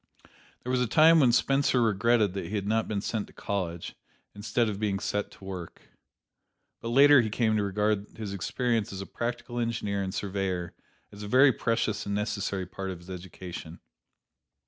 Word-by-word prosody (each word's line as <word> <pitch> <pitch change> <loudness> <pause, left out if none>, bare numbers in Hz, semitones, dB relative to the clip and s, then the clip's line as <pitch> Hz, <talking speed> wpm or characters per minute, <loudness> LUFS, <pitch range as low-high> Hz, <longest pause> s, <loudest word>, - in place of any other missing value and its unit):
There 125 - -3
was 130 -1 +2
a 125 - +1
time 160 +7 +6
when 130 -5 +5
Spencer 135 +1 +2
regretted 110 -2 +2
that 95 - -4
he 105 - -4
had 100 -2 -2
not 110 +2 +1
been 105 -2 -2
sent 110 0 -3
to - - -18
college, 85 -4 -4 0.4
instead 105 +3 0
of 100 -2 -3
being 105 -2 0
set 105 0 -2
to - - -17
work. 90 -3 -8 0.9
But - - -7
later 140 +3 +7
he 110 - -2
came 110 0 +1
to 105 - +2
regard 105 +1 0
his 105 -3 -5
experience 115 +3 -1
as 95 -1 -5
a - - -5
practical 120 +2 -4
engineer 110 -4 -1
and 95 -1 -3
surveyor 95 -3 -3 0.4
as 100 - -11
a 105 - -5
very 130 +5 +6
precious 115 -2 -1
and 100 - -1
necessary 100 -2 -2
part 95 +2 -6
of 95 - -5
his 85 +2 -12
education. 90 -2 -8
105 Hz, 185 wpm, -28 LUFS, 95-115 Hz, 0.9 s, later